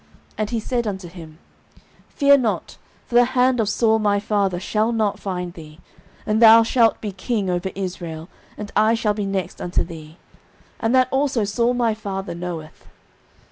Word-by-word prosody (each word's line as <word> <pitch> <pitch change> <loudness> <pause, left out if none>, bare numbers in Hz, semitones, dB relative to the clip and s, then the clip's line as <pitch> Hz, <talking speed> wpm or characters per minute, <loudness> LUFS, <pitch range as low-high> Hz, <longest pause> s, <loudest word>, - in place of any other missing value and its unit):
09:023:017 - - -28
And 215 -1 -1
he 230 - -1
said 235 +1 -2
unto 190 -3 -5
him, 165 -2 -12 0.7
Fear 280 -1 +4
not: 230 -4 -2 0.3
for - - -14
the 240 +1 +7
hand 250 0 +3
of 215 -3 +1
Saul 220 0 +2
my 205 -1 +1
father 200 -3 0
shall 215 +4 0
not 220 -3 0
find 180 -3 -4
thee; 155 -1 -13 0.5
and 215 +1 0
thou 225 0 +8
shalt 230 -1 +2
be 210 - -4
king 195 0 -2
over 180 +1 -2
Israel, 175 -4 -6 0.3
and 210 -1 -7
I 215 +2 +4
shall 215 -2 0
be 205 -1 -3
next 190 -3 -4
unto 180 - -1
thee; 160 -1 -11 0.6
and 225 +3 +1
that 255 -1 +4
also 265 -4 +1
Saul 235 +4 0
my 235 -2 +1
father 195 -3 -5
knoweth. 170 -3 -7
210 Hz, 180 wpm, -21 LUFS, 180-230 Hz, 0.7 s, thou